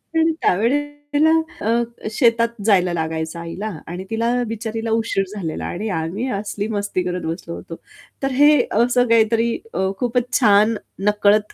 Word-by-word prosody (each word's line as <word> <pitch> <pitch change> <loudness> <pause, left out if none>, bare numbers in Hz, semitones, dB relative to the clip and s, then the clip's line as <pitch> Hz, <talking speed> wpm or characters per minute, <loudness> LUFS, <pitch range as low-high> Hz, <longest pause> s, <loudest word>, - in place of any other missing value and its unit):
आणि 325 0 +4
त्यावेळेला 290 - +1 0.4
अ, 230 - +4 0.4
शेतात 230 0 +3 0.2
जायला 185 -4 +3
लागायचं 160 0 -3
आईला 170 +6 -5 0.2
आणि 175 +3 -5
तिला 230 +2 0
बिचारीला 225 0 -4
उशीर 225 -3 +1
झालेला 165 -6 -4
आणि 210 +5 -4
आम्ही 180 +10 -3
असली 205 0 -4
मस्ती 200 -4 -2
करत 180 0 -3
बसलो 165 +1 -5
होतो. 165 - -8 0.5
तर 270 - +1
हे 290 +2 +5
असं 245 +2 +3
काहीतरी 230 +1 +3 0.2
अ, 190 0 0
खूपच 245 0 -1
छान 210 -1 +5
न 220 - -3 0.3
नकळत 210 0 +2
220 Hz, 145 wpm, -20 LUFS, 190-240 Hz, 0.5 s, हे